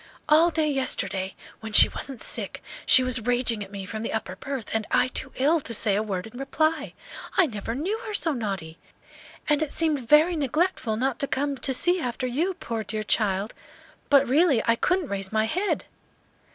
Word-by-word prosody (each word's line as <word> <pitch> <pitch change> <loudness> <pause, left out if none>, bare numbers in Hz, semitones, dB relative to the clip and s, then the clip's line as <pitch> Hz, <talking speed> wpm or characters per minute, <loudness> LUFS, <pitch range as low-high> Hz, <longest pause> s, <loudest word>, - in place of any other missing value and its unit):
"All 315 +3 +5
day 315 -2 -1
yesterday, 195 -9 -1 0.2
when 220 -1 -9
she - - +10
wasn't 270 -4 -4
sick - - -1 0.2
she 260 - +9
was 255 -1 +2
raging 240 -2 0
at 195 - -12
me 200 -1 -7
from 215 +3 -6
the 230 - -4
upper 220 -4 -4
berth, 265 +1 -6
and 220 -1 -2
I 255 - +2
too 260 +1 -3
ill 300 +6 +2
to 235 -5 -1
say 205 -1 +3
a 205 - +1
word 195 -4 -4
in 225 +3 -11
reply. 310 +3 -1 0.4
I 375 - +5
never 225 -3 -5
knew 380 - -3
her 425 - -5
so 325 -3 -1
naughty! 195 - -5 0.7
And 295 0 +1
it 310 - -2
seemed 315 -3 +1
very 315 +4 +5
neglectful 295 -5 -1
not 260 +3 -1
to 280 - -1
come 280 +1 -2
to 260 +2 -2
see 350 +8 +3
after 250 0 -3
you, 320 +10 -1
poor 225 -7 -5
dear 215 +1 -4
child! 205 -1 0 0.6
but 280 -1 +4
really 280 -2 +3
I 230 - +3
couldn't 365 +6 0
raise 195 -1 -4
my 220 0 +1
head." 370 - -2
255 Hz, 195 wpm, -25 LUFS, 220-305 Hz, 0.7 s, she